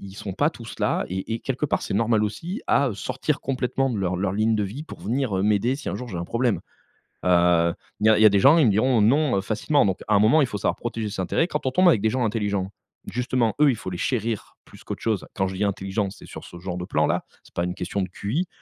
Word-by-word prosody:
ils 95 Hz, -1 st, -10 dB
sont 100 Hz, -1 st, -6 dB
pas 145 Hz, -, +1 dB
tous 115 Hz, -8 st, -10 dB
là -, -, +1 dB
et 95 Hz, +5 st, -3 dB
et 115 Hz, -, -4 dB
quelque 135 Hz, +3 st, -2 dB
part -, -, -1 dB
c'est -, -, -3 dB
normal 110 Hz, 0 st, +2 dB
aussi, 170 Hz, -, -4 dB
à, 140 Hz, -, +3 dB
heu, -, -, -5 dB
sortir 130 Hz, +7 st, -2 dB
complètement 135 Hz, 0 st, -1 dB
de 110 Hz, -, -2 dB
leur 95 Hz, -1 st, -1 dB
leur 95 Hz, +1 st, -1 dB
ligne 110 Hz, +2 st, +2 dB
de 105 Hz, -, 0 dB
vie 110 Hz, +10 st, -6 dB
pour -, -, -11 dB
venir, 120 Hz, -2 st, -1 dB
heu, 95 Hz, -, 0 dB
m'aider 105 Hz, +5 st, +2 dB
si 150 Hz, -, -6 dB
un -, -, -2 dB
jour 125 Hz, -, -7 dB
j'ai 95 Hz, -, -5 dB
un 85 Hz, -, -3 dB
problème. 115 Hz, +2 st, 0 dB, 0.7 s
Heu, 85 Hz, -1 st, +4 dB, 0.3 s
il 110 Hz, -, +2 dB
y -, -, +7 dB
a 110 Hz, -, +5 dB
il -, -, +2 dB
y -, -, +8 dB
a 110 Hz, -, +10 dB
des 100 Hz, -, +3 dB
gens, 140 Hz, +10 st, +7 dB
ils 155 Hz, -, +5 dB
me 105 Hz, -, +4 dB
diront: 115 Hz, +3 st, +3 dB
«Non», 135 Hz, +3 st, +3 dB
heu, -, -, +1 dB
facilement, 110 Hz, +6 st, +1 dB
donc 95 Hz, -1 st, 0 dB
à 105 Hz, -, +3 dB
un -, -, +5 dB
moment 115 Hz, +9 st, +5 dB
il 135 Hz, -, +3 dB
faut 105 Hz, -, -4 dB
savoir -, -, 0 dB
protéger 115 Hz, -3 st, -4 dB
ses 95 Hz, -, -4 dB
intérêts. 160 Hz, -, +1 dB
Quand 150 Hz, -5 st, -4 dB
on 130 Hz, -, +1 dB
tombe 185 Hz, +5 st, +4 dB
avec 115 Hz, -, +4 dB
des 110 Hz, -, +2 dB
gens 125 Hz, +1 st, 0 dB
intelligents, 100 Hz, -3 st, -1 dB, 0.4 s
justement 125 Hz, -3 st, 0 dB
eux, 150 Hz, -, +7 dB
il -, -, -2 dB
faut 95 Hz, -, -6 dB
les 90 Hz, -, -4 dB
chérir 115 Hz, -3 st, -2 dB
plus -, -, -16 dB
qu'autre -, -, -6 dB
chose, 110 Hz, -4 st, -1 dB
quand 95 Hz, -2 st, 0 dB
je 95 Hz, -, -5 dB
dis 100 Hz, -, -1 dB
intelligent, 100 Hz, +1 st, -2 dB
c'est 100 Hz, -, -13 dB
sur -, -, -9 dB
ce 85 Hz, -, -11 dB
genre 90 Hz, -1 st, -5 dB
de 90 Hz, -, -4 dB
plan-là, -, -, 0 dB, 0.2 s
c'est -, -, -21 dB
pas 85 Hz, -, 0 dB
une 90 Hz, -, -3 dB
question 100 Hz, +1 st, -3 dB
de 95 Hz, -, -1 dB
QI. 135 Hz, -, -2 dB
110 Hz, 285 wpm, -24 LUFS, 95-130 Hz, 0.7 s, a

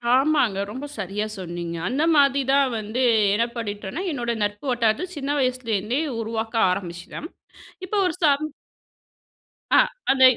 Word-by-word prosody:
ஆமாங்க. 265 Hz, -8 st, +2 dB
ரொம்ப 265 Hz, +5 st, -6 dB
சரியா 200 Hz, +1 st, -2 dB
சொன்னீங்க. 175 Hz, -2 st, -5 dB
அந்த 280 Hz, +5 st, 0 dB
மாதி 280 Hz, -1 st, +4 dB
தான் 275 Hz, -1 st, +4 dB
வந்து, 215 Hz, +5 st, -3 dB, 0.3 s
என்ன 230 Hz, +2 st, +2 dB
பண்ணீட்டோம்னா, 210 Hz, -, -4 dB
என்னோட 240 Hz, -5 st, -2 dB
நட்பு 205 Hz, +5 st, -3 dB
வட்டாரத்த 235 Hz, +8 st, +1 dB
சின்ன 280 Hz, 0 st, -4 dB
வயசுலேருந்தே 250 Hz, -1 st, 0 dB, 0.2 s
உருவாக்க 225 Hz, +1 st, -3 dB
ஆரம்பிச்சுட்டேன். 180 Hz, -, -5 dB, 0.6 s
இப்ப 420 Hz, -, -5 dB
ஒரு 350 Hz, -, -1 dB
சப் 295 Hz, 0 st, +3 dB, 1.3 s
ஆ -, -, +8 dB, 0.3 s
அந்த 265 Hz, -1 st, +4 dB
235 Hz, 125 wpm, -24 LUFS, 205-280 Hz, 1.3 s, ஆ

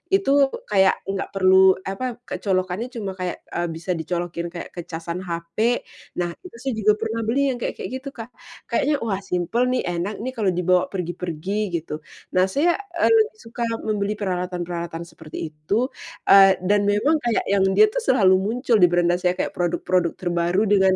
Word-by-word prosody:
itu 280 Hz, -7 st, +4 dB, 0.2 s
kayak 190 Hz, -1 st, +5 dB
nggak 195 Hz, 0 st, -3 dB
perlu, 190 Hz, 0 st, +6 dB
apa, 235 Hz, +5 st, -3 dB
kayak -, -, -6 dB
colokannya 185 Hz, +3 st, -1 dB
cuma 225 Hz, -6 st, -5 dB
kayak, 180 Hz, -1 st, -4 dB
eee, 175 Hz, 0 st, -1 dB
bisa 165 Hz, +3 st, -4 dB
dicolokin 170 Hz, 0 st, -3 dB
kayak 170 Hz, 0 st, -8 dB
ke 175 Hz, -2 st, -8 dB
casan 170 Hz, +1 st, -5 dB
HP. 180 Hz, +7 st, -1 dB, 0.3 s
Nah, 175 Hz, -1 st, -1 dB
itu 365 Hz, -9 st, -13 dB
saya 265 Hz, +3 st, -3 dB
juga 210 Hz, 0 st, +4 dB
pernah 225 Hz, +1 st, -3 dB
beli 275 Hz, +3 st, +2 dB
yang 245 Hz, -, -5 dB
kayak -, -, -3 dB
kayak -, -, -6 dB
gitu, 275 Hz, +1 st, -7 dB
Kak. 230 Hz, +1 st, -8 dB, 0.4 s
Kayaknya, 290 Hz, +5 st, +2 dB
"Wah, 195 Hz, -4 st, -1 dB
simpel 195 Hz, +7 st, 0 dB
nih, 250 Hz, 0 st, 0 dB
enak 195 Hz, +6 st, -3 dB
nih 260 Hz, -, -2 dB
kalo 225 Hz, -5 st, -2 dB
dibawa 180 Hz, 0 st, +2 dB
pergi-pergi", 180 Hz, +1 st, -3 dB
gitu. 155 Hz, -2 st, -6 dB, 0.3 s
Nah, 185 Hz, +1 st, +3 dB
saya, 330 Hz, -, +1 dB, 0.2 s
eee, 335 Hz, -, +3 dB
lebih 440 Hz, -1 st, +4 dB
suka 235 Hz, +1 st, -5 dB, 0.2 s
membeli 210 Hz, -1 st, -1 dB
peralatan-peralatan 180 Hz, -3 st, -3 dB
seperti 160 Hz, -1 st, -8 dB
itu, 200 Hz, -, -1 dB, 0.4 s
eee, 195 Hz, -1 st, +8 dB
dan 205 Hz, +1 st, +2 dB
memang 280 Hz, +10 st, +2 dB
kayak 240 Hz, -3 st, 0 dB
yang 195 Hz, -1 st, +2 dB
dia 430 Hz, 0 st, +6 dB
tuh -, -, -1 dB
selalu 190 Hz, -7 st, +5 dB
muncul 230 Hz, +3 st, +1 dB
di 180 Hz, -, +7 dB
beranda 175 Hz, 0 st, +2 dB
saya, 180 Hz, 0 st, +1 dB
kayak -, -, -2 dB
produk-produk 175 Hz, 0 st, 0 dB
terbaru 175 Hz, +2 st, 0 dB
dengan, 190 Hz, -2 st, +4 dB
190 Hz, 180 wpm, -23 LUFS, 175-230 Hz, 0.4 s, eee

